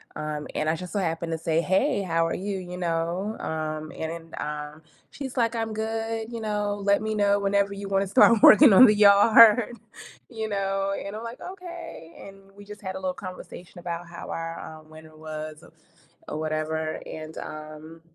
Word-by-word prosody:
um, 150 -1 -4
and 155 - 0
I 160 - +1
just 180 +3 -8
so 205 - 0
happened 165 -1 -2
to 165 - -1
say, 160 0 0
"Hey, 200 - +1
how 165 -2 +1
are - - -2
you," 195 0 -4
you 180 0 -8
know, 175 +4 -2
um, 155 -1 -4
and, 165 +1 -6
uh, 150 0 -6 0.3
she's 270 -2 -7
like, 235 0 +1
"I'm 225 -1 -2
good, 225 +1 -3
you 230 - -5
know, 210 -1 -2
let 200 +1 +3
me 215 0 -2
know 205 -1 +2
whenever 200 0 +1
you 200 0 -7
wanna 195 0 +1
start 215 +3 +5
working 250 -1 +9
on 255 +6 +10
the 210 -2 +5
yard," 215 +3 +6 0.5
you 220 -2 -4
know, 195 -1 -1
and 200 +1 -6
I'm 220 - -6
like, 230 +2 -8
"Okay," 345 - -9
and 195 0 -16
we 205 - -13
just 210 +1 -11
had 190 -1 -5
a - - -5
little 185 -1 -2
conversation 185 -1 -10
about 170 0 -5
how 170 - -9
our, 165 0 -5
um, 155 0 -11
winter 155 0 -14
was 155 0 -8
o - - -15 0.6
or - - -5
whatever 155 0 -2
and, 155 0 -8
um 155 +1 -9
190 Hz, 190 wpm, -25 LUFS, 160-210 Hz, 0.6 s, on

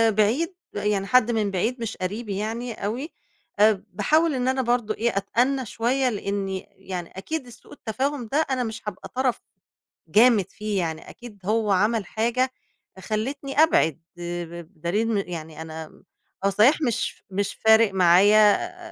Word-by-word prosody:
بعيد 245 - +2 0.2
ب - - -21
يعني 205 -1 0
حد 250 -2 +4
من 215 -3 0
بعيد 230 +7 -1
مش 225 - -4
قريبي 200 +2 -4
يعني 230 +3 -3
أوي، 235 +10 -4 0.5
آآ، 210 -2 +4
باحاول 310 +8 +2
إن 250 0 -1
أنا 260 0 +1
برضه 240 -3 0
إيه 230 -2 -1
أتأنى 250 +6 +1
شوية، 250 +4 0
لأني 200 -3 -3
يعني 185 -3 -7
أكيد 300 +7 -4
السوء 240 - -14
التفاهم 260 +2 -3
ده 285 - +1
أنا 255 -1 0
مش 225 -1 -5
هابقى 195 - -6
طرف 255 -2 0 0.7
جامد 215 +2 +5
فيه 210 -2 -2
يعني 160 -2 -4
أكيد 235 -4 -12
هو 215 0 +1
عمل 210 +2 +2
حاجة 240 +6 0 0.4
فخلّتني 240 +8 -3
أبعد، 165 - +2 0.2
آآ 175 0 -4
ب - - -14
بِدَليل 175 +6 -2
إن 195 -2 -3
يعني 160 -2 -7
أنا 160 -1 -9 0.4
هو - - +5
صحيح 225 +11 +4
مش 240 -6 -1
مش 195 +1 -2
فارق 220 -2 +5
معايا 205 - +5
215 Hz, 155 wpm, -24 LUFS, 195-245 Hz, 0.7 s, جامد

